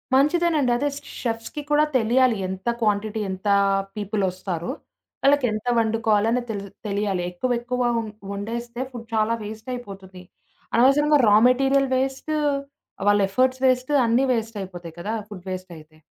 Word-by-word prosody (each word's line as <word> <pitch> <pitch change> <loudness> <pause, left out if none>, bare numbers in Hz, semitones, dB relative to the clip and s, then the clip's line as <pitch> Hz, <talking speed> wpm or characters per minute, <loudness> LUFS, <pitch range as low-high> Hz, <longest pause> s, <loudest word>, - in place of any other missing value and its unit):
మంచిదేనండి. 300 -1 +3
అదే. 290 +4 0
స్ - - -6 0.2
షెఫ్స్‌కి 230 +5 -3
కూడా 300 +1 +5
తెలియాలి. 240 0 +3
ఎంత 190 +3 -6
క్వాంటిటీ 215 0 0
ఎంత 190 +2 -6 0.5
పీపులొస్తారు? 190 -2 -2 0.5
వాళ్ళకి 280 -1 +4
ఎంత 215 +2 -5
వండుకోవాలి? 220 -1 +2
అని 250 - +1
తెలి 200 -2 -4 0.2
తెలియాలి. 200 -2 -1
ఎక్కువెక్కువ 245 +5 -2 0.2
వం 225 -1 -2 0.2
వండేస్తే 235 +4 -5
ఫుడ్ 235 -2 -9
చాలా 220 +1 +2
వేస్టయిపోతుంది. 205 -4 -8 0.5
అనవసరంగా 285 +5 +5
రా 210 - +6
మెటీరియల్ 270 +1 +3
పేస్ట్, 270 +3 -2 0.8
వాళ్ళ 205 0 +4
ఎఫర్ట్స్ 255 +5 +1
పేస్ట్ 255 +1 +2
అన్నీ 235 +4 +3
వేస్టయిపోతాయి 190 -7 -5
కదా! 210 +5 -3 0.2
ఫుడ్ 195 -4 -9
పేస్టయితే. 170 -4 -8
225 Hz, 125 wpm, -23 LUFS, 200-255 Hz, 0.8 s, రా